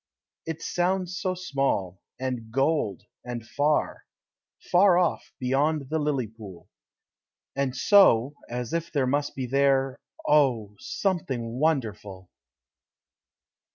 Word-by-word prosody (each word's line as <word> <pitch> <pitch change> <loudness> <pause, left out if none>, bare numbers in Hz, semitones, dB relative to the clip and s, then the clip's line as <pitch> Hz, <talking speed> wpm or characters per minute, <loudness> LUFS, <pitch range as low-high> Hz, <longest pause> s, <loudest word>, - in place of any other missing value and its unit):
It 160 0 -5
sounds 180 0 -1
so 185 0 -2
small, 135 - -1 0.2
and 125 -4 -4
gold, 135 - 0 0.2
and 120 -2 -6
far 145 +5 0 0.6
Far 180 0 +6
off, 180 -2 0
beyond 140 +2 0
the 160 - +1
lily 145 -4 0
pool; 100 -6 -12 0.9
And 135 -2 -1
so, 140 - +5 0.2
as 120 +1 -4
if 170 0 -2
there 140 -4 +1
must 145 +3 -1
be 130 - -3
there 135 0 +2 0.3
Oh, 125 -9 +3
something 130 - -2
Wonderful! 105 - -2
135 Hz, 110 wpm, -26 LUFS, 120-160 Hz, 0.9 s, Far